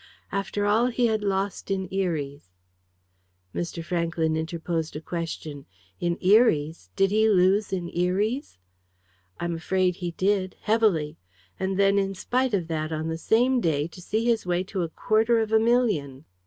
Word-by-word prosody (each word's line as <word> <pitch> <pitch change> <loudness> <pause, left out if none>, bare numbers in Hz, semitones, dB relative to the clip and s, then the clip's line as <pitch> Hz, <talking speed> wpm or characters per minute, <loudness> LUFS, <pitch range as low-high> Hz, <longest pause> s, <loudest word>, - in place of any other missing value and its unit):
"After 200 +1 -2
all 220 +4 +3
he 245 0 +1
had 220 -2 +1
lost 195 0 -2
in 190 -1 -1
Eries 150 - -3 0.6
" 90 0 -44
Mr. 170 -1 -4
Franklyn 170 -2 0
interposed 160 0 -3
a - - -3
question. 155 -4 -6 0.3
"In 175 0 -1
Eries! 165 - +3
Did 195 0 +2
he 220 +1 +3
lose 195 +1 +3
in 180 -3 -2
Eries?" 200 - -1 0.8
"I - - -2
am 170 - -1
afraid 180 +2 0
he 175 -1 -3
did, 185 +2 0
heavily. 205 - +1 0.4
And 190 0 -1
then, 200 0 +4
in 195 0 -1
spite 250 +4 0
of 175 -4 -2
that, 155 -1 -3
on 155 +1 -2
the 160 - -2
same 245 +6 +2
day, 150 -4 0
to 180 - -12
see 220 +5 -1
his 230 -2 +2
way 180 0 0
to 190 0 -4
a 170 - -2
quarter 220 +7 +2
of 220 -1 0
a 220 - +5
million!" 210 - +1
185 Hz, 170 wpm, -25 LUFS, 160-210 Hz, 0.8 s, a